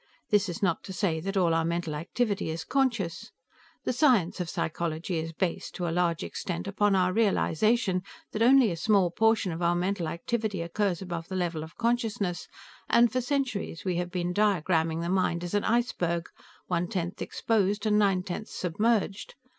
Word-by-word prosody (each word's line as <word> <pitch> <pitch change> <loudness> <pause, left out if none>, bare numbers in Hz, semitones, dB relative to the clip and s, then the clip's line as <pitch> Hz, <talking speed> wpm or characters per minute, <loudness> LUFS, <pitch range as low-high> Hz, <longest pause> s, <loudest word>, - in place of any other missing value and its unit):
This 205 -2 +3
is 175 - -5
not 170 -4 +1
to 190 - -6
say 180 -4 0
that 195 +4 -3
all 175 -3 +3
our 165 0 +2
mental 170 -1 -2
activity 200 +6 -1
is 160 +1 -3
conscious. 240 -10 -1 0.5
The - - 0
science 240 - +3
of 175 -2 -2
psychology 165 +1 -2
is 165 +1 -4
based, 170 +1 -3
to 175 - -2
a - - -1
large 170 -2 +1
extent, 175 +1 -4
upon 205 0 +2
our 185 -1 +2
realization 215 -1 +2 0.3
that 215 - -3
only 250 -2 +6
a - - -2
small 195 -1 +3
portion 220 -1 +2
of 165 +1 -5
our 170 0 +2
mental 180 -1 -1
activity 200 +2 -2
occurs 190 +1 -1
above 170 -2 -5
the 190 - -5
level 175 -3 -1
of 160 - -12
consciousness, 225 -7 -1 0.4
and 235 0 +5
for 255 - 0
centuries 250 - -2
we 180 -2 0
have 175 0 -2
been 180 0 -2
diagraming 170 -5 +1
the - - -2
mind 180 -2 +1
as 175 - -5
an 205 - +1
iceberg, 180 -8 0 0.4
one 175 -1 -1
tenth 180 -3 -3
exposed 210 -1 0
and 210 -1 +3
nine 195 -3 +2
tenths 200 +3 -6
submerged. 205 +3 0
185 Hz, 180 wpm, -28 LUFS, 170-215 Hz, 0.5 s, only